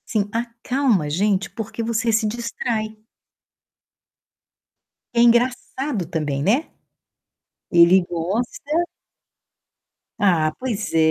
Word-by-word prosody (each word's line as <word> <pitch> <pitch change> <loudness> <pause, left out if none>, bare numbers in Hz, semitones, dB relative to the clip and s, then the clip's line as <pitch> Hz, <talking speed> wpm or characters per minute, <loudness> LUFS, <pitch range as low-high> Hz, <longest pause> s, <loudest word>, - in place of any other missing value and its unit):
Sim, 205 -3 0
acalma 235 - 0
a - - -3
gente, 195 +4 +1
porque 225 +1 -6
você 230 +1 0
se 220 0 +2
distrai. 220 -1 -3 2.2
É 235 - +1
engraçado 240 - +1
também, 150 -5 -2
né? 230 - +1 1.0
Ele 175 +1 +6
gosta 230 - -2 1.4
Ah, 165 -6 +3
pois 230 -5 -3
é, - - +2
220 Hz, 90 wpm, -22 LUFS, 185-240 Hz, 2.2 s, Ele